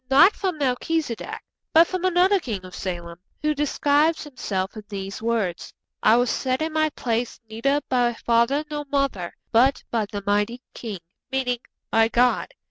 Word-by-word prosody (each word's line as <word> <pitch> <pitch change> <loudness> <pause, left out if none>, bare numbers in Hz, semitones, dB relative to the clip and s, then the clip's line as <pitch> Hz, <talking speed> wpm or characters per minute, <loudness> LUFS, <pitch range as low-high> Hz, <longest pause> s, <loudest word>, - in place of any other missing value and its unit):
Not 285 +9 +7
from 370 -5 -2
Melchizedek, 280 -1 -2 0.3
but 330 +1 +8
from 370 +1 -3
another 370 +2 +4
king 210 - -5
of 185 - -11
Salem, 170 -2 -5 0.2
who 305 0 +2
describes 295 +2 +2
himself 200 -10 -3
in 215 - -7
these 195 -1 -5
words: 220 -6 -2 0.3
'I 220 - +6
was 245 0 +2
set 260 +3 0
in 320 0 -3
my 310 0 +2
place 240 -4 -2
neither 275 +7 0
by 245 -2 +2
father 235 +7 +2
nor 295 0 -3
mother, 275 -11 -1 0.2
but 255 +5 +4
by 225 -3 0
the 205 -1 -4
Mighty 210 +5 0
King' 210 -7 -6 0.3
meaning 250 -2 0 0.3
'by 225 0 +5
God.' 245 - +2
245 Hz, 160 wpm, -24 LUFS, 220-295 Hz, 0.3 s, but